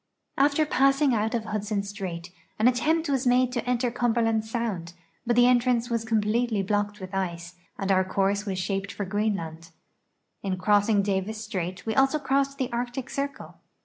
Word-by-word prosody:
After 285 +3 +3
passing 275 -1 +3
out 220 +1 0
of 225 -2 -2
Hudson 210 -1 -2
strait, 185 -4 -6 0.3
an 220 - +4
attempt 315 +7 +2
was 270 -2 0
made 250 0 +3
to 240 -2 -2
enter 245 0 +1
Cumberland 230 -2 +1
sound, 220 -7 -3 0.3
l)Ut 240 - +2
the 245 0 +6
entrance 245 -1 +2
was 230 -1 -1
conipletely 220 -1 +1
blocked 205 +1 -1
with 185 0 -8
ice, 175 -2 -3 0.2
and 195 0 -1
our 190 0 +4
course 195 +2 0
was 195 -3 -3
shaped 195 +1 -2
for 205 - -4
(Jreenland. 185 -5 -2 0.7
In 190 -2 -2
crossing 205 +2 +3
Davis 205 +2 -2
strait 185 -4 -4
we 220 - -1
also 270 +4 +3
cro.ssed 275 -1 0
the 260 -3 -2
Arctic 245 +2 -3
Circle. 280 +1 -5
220 Hz, 170 wpm, -26 LUFS, 195-245 Hz, 0.7 s, the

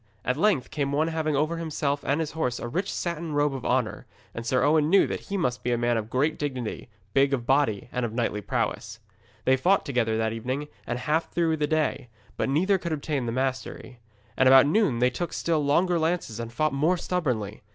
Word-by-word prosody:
At 125 - +1
length 165 - +1
came 140 -2 -1
one 155 +3 +1
having 160 -2 -1
over 155 +4 0
himself 145 -3 -2
and 140 +3 0
his 160 -2 -2
horse 125 -7 -1
a - - -5
rich 185 +11 -2
satin 170 -2 -3
robe 145 -1 +2
of 130 -2 -6
honour, 125 -4 -1 0.3
and 115 - -5
Sir 130 - +2
Owen 150 +1 +3
knew 195 +3 +5
that - - -3
he 200 - -1
must 125 -9 -1
be 125 - -1
a 120 - +2
man 120 0 +1
of 110 -1 -3
great 145 +6 0
dignity, 130 -4 -4 0.2
big 140 0 +4
of 120 -3 -7
body 135 -7 +1
and 125 - -2
of 115 - -2
knightly 115 -2 -1
prowess. - - -2 0.5
They 130 - +5
fought 185 +9 +2
together 115 -5 0
that 110 0 0
evening 130 +6 -4 0.2
and 120 - -2
half 155 +5 0
through 165 -2 +1
the 150 -1 0
next 155 0 +1
day, 125 - -17 0.3
but - - -1
neither 185 +8 +2
could 170 -2 -3
obtain 145 -4 -2
the - - -1
mastery. 130 0 -3 0.4
And 130 - +5
about 135 +1 +8
noon 155 - +2
they 125 +1 +3
took 175 +5 -4
still 160 -3 0
stronger 170 +5 +2
lances 160 -9 -1
and 115 0 -5
fought 155 +4 0
most 160 +6 +1
stubbornly. 125 - -2
140 Hz, 220 wpm, -26 LUFS, 125-160 Hz, 0.5 s, about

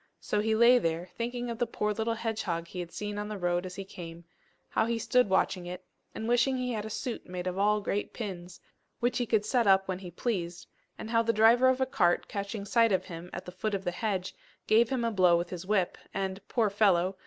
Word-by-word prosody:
So 210 - -1
he 220 +1 +1
lay 235 +2 +6
there 165 -1 -2
thinking 240 +1 -3
of 230 - -6
the 240 - +1
poor 210 -1 -1
little 225 +2 -1
hedgehog 215 -7 -3
he 180 - -7
had 175 -1 -5
seen 205 +3 -4
on 210 - -3
the 210 -1 -5
road 175 0 0
as 180 - -9
he 195 - -6
came; 170 -2 -9 0.4
how 220 - +1
he 235 0 0
stood 250 0 +2
watching 185 -1 +1
it, 180 +1 -7 0.3
and 220 - -4
wishing 245 +2 +3
he 250 0 -2
had 215 -2 -3
a - - -5
suit 220 +3 -4
made 180 0 -4
all 200 +3 +2
of 210 - -5
great 205 0 -2
pins, 180 -5 -7 0.4
which 245 +1 +1
he 245 - -1
could 215 -2 +2
set 235 0 +2
up 195 0 +5
when 185 -1 -3
he 185 -2 -8
pleased; 175 -2 -3 0.3
and 220 - -7
how 230 -1 +4
the 230 0 +2
driver 230 +4 +5
of 260 0 +1
a 260 - +3
cart, 180 -9 +1
catching 200 +1 -4
sight 230 +1 +3
of 190 - +1
him 175 -1 -8
at - - -7
the 180 - -7
foot 200 +3 -2
of 195 - -4
the 175 - -1
hedge, 190 -1 -2 0.3
gave 225 +1 +4
him 255 -3 0
a 230 - +1
blow 180 -4 +5
with 175 0 -3
his 180 0 -6
whip, 195 -4 +1 0.2
and, 190 0 -2
poor 220 -4 +1
fellow! 190 -3 +3
205 Hz, 245 wpm, -29 LUFS, 180-230 Hz, 0.4 s, lay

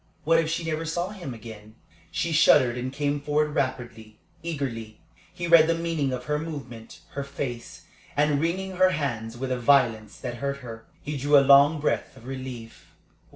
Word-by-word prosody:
What 165 +2 +4
if 160 -1 0
she 165 +1 -2
never 160 0 -2
saw 175 +3 -2
him 185 -9 -7
again? 110 -2 -11 0.3
She 170 -1 -2
shuddered 145 -6 +5
and 125 +1 -4
came 145 +1 -1
forward 150 +1 0
rapidly, 120 -5 -3 0.2
eagerly. 125 -9 -5 0.3
He 175 -1 -5
read 165 -2 +7
the 165 - +2
meaning 165 -5 -1
of 125 -1 -4
her 150 0 0
movement, 135 -8 -8
her 140 - -4
face; 135 -4 -6 0.3
and, 145 -1 +2
wringing 185 +3 -2
her 185 0 +5
hands 120 -9 -3
with 130 +1 -4
a 125 - -1
violence 115 -5 +2
that 120 -2 -6
hurt 140 +2 -2
her, 115 -1 -9 0.2
he 150 +1 -4
drew 145 +2 +4
a 140 - +5
long 140 +3 +6
breath 145 -2 -1
of 120 - -15
relief. 130 -3 -8
140 Hz, 180 wpm, -26 LUFS, 120-160 Hz, 0.3 s, read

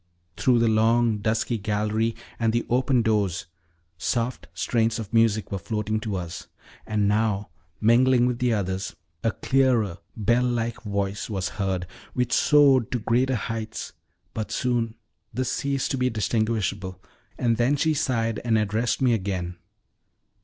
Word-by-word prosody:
Through 125 -2 +3
the 115 0 +3
long, 110 0 +3
dusky 110 +2 0
gallery 110 +2 0 0.2
and 115 -1 +2
the 120 - 0
open 125 -1 +3
doors 105 -6 0 0.5
soft 120 -4 -1
strains 115 +6 0
of 110 -2 -7
music 115 -2 +2
were 100 - -2
floating 110 +2 -2
to 110 -2 -3
us, 85 -2 -5 0.4
and 105 -2 +1
now, 105 -1 +1 0.3
mingling 120 +2 +4
with 125 -1 -1
the 125 -1 +2
others, 95 -3 -2 0.3
a 115 - +3
clearer, 125 -10 +1 0.2
bell 120 +3 +2
like 120 -2 -1
voice 100 -2 -2
was 95 -4 -2
heard, 95 -3 -2 0.3
which 125 -1 0
soared 140 -6 +5
to - - +2
greater 125 +3 +1
heights; 110 0 -4 0.4
but 110 - -4
soon 120 -3 0 0.4
this 130 0 -1
ceased 140 -5 -1
to 135 - -1
be 125 0 +2
distinguishable, 105 -4 -1 0.4
and 115 -2 +1
then 125 +4 +3
she 155 +3 +2
sighed 115 -5 0
and 115 -2 +2
addressed 110 +4 0
me 125 -2 +4
again. 95 -4 -2
115 Hz, 145 wpm, -25 LUFS, 105-120 Hz, 0.5 s, soared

